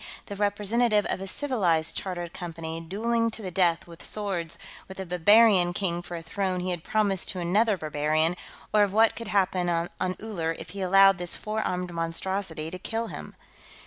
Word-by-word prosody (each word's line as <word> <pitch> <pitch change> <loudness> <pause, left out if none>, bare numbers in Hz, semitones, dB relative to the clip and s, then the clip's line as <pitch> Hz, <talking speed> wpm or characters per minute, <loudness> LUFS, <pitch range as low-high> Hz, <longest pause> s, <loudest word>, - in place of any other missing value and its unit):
the 200 - -7
representative 210 +2 +1
of - - -3
a 195 - -5
civilized 190 - 0
Chartered 175 -3 -4
Company, 165 -1 -6
dueling 230 +7 0
to 220 -1 -8
the 185 - -4
death 175 -2 +2
with 170 -1 -13
swords 190 -6 -1 0.3
with 190 0 -10
a 190 - -4
barbarian 180 +1 +5
king 175 -2 -1
for 175 - -8
a 165 - -8
throne 185 +2 -2
he 180 +1 -2
had 175 -2 -3
promised 205 -4 0
to 185 - -1
another 200 +5 +2
barbarian, 155 +1 +1 0.4
or 210 - +5
of 200 -2 +2
what 220 +1 +4
could 230 - -7
happen 185 -3 +1
on 170 0 0 0.3
Uller 170 -7 -3
if - - -8
he 200 - -6
allowed 195 0 +5
this 175 -1 +1
four 215 +1 -3
armed 180 -3 -3
monstrosity 165 -1 -3
to 185 - -7
kill 225 +4 -3
him. - - -8
185 Hz, 185 wpm, -27 LUFS, 170-205 Hz, 0.4 s, barbarian